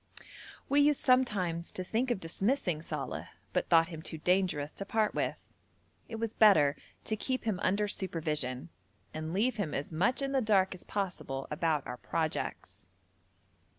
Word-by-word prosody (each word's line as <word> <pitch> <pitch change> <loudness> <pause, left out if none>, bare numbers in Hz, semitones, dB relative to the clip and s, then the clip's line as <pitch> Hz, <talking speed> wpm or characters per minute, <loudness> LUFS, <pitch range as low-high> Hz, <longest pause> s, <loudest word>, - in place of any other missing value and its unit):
We 285 +1 +4
used 295 -1 +4
sometimes 200 -10 +2
to 185 - -3
think 230 +7 0
of 240 - 0
dismissing 180 - 0
Saleh, - - -4 0.3
but - - 0
thought 165 0 +5
him 160 -3 -7
too 160 - -6
dangerous 175 -3 +1
to - - -5
part 215 +1 +1
with. - - -2 0.7
It 225 - -5
was 225 0 -3
better 155 -10 +6 0.3
to 220 - -1
keep 255 +4 -2
him 215 -5 -1
under 210 +2 +2
supervision, 155 -7 -2 0.4
and 155 +1 -4
leave 230 +7 +1
him 190 -8 -2
as 140 - -3
much 205 - +1
in 275 - -1
the 270 -1 +2
dark 195 -4 +3
as 185 - -10
possible 175 -9 -3
about 150 -2 0
our 125 - -5
projects. 160 +4 -3
185 Hz, 160 wpm, -31 LUFS, 160-220 Hz, 0.7 s, better